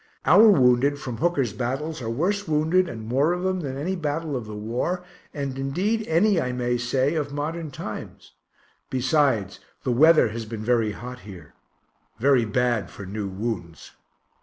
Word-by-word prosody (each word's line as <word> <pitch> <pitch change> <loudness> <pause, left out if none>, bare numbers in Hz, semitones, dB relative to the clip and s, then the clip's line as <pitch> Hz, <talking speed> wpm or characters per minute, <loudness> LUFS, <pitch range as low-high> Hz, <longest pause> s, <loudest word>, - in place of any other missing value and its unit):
Our 220 +1 +7
wounded 135 -4 +4
from 125 -5 -6
Hooker's 145 - 0
battles 135 +7 -3
are 115 - -4
worse 185 - -1
wounded 160 +4 +2
and 110 -2 -7
more 135 +8 +2
of 180 0 -3
them 185 0 0
than 135 -5 -4
any 175 +7 -2
battle 155 -2 -2
of 120 -4 -4
the 105 - -7
war, 120 +12 -2 0.3
and 140 -2 -4
indeed 195 +12 -1
any, 175 +2 +3
I 125 -1 -2
may 125 0 0
say, 130 +4 +1
of 150 -3 -2
modern 155 +3 -4
times 140 - -8 0.6
besides, 130 - +1 0.2
the 130 - 0
weather 155 +1 +5
has 115 +1 -5
been 110 -1 -6
very 115 -3 +2
hot 125 +4 -8
here, 90 -9 -12 0.6
very 130 0 +3
bad 120 0 0
for 100 - -9
new 100 +1 -4
wounds. 95 -5 -5
130 Hz, 165 wpm, -24 LUFS, 115-160 Hz, 0.6 s, Our